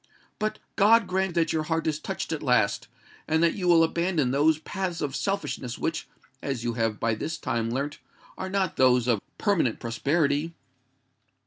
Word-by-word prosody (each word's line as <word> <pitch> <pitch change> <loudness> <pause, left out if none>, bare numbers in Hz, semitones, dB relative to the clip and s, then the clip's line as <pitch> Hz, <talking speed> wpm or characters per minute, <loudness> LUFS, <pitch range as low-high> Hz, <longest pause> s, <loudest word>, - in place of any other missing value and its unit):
But 215 0 -1 0.2
God 225 +2 +6
grant 190 -1 -1
that 165 -2 +2
your 160 - +1
heart 160 +1 -1
is 155 -1 0
touched - - -4
at 160 - -2
last, 125 -7 +2 0.4
and 160 +1 +2
that 170 - +4
you 185 -3 -3
will 170 -2 +6
abandon 165 -5 +1
those 150 +3 +3
paths 175 +2 -4
of 140 -2 -2
selfishness 135 - -2
which, 160 -1 -2 0.3
as 135 -4 -3
you 120 -1 -1
have 115 -2 -1
by 115 0 +1
this 155 +9 -4
time 115 -6 -2
learnt, 140 +4 -3 0.4
are 190 - -5
not 190 -3 -1
those 125 -2 +4
of 115 -5 +2 0.2
permanent 175 - +1
prosperity! 145 +6 0
155 Hz, 175 wpm, -26 LUFS, 125-175 Hz, 0.4 s, God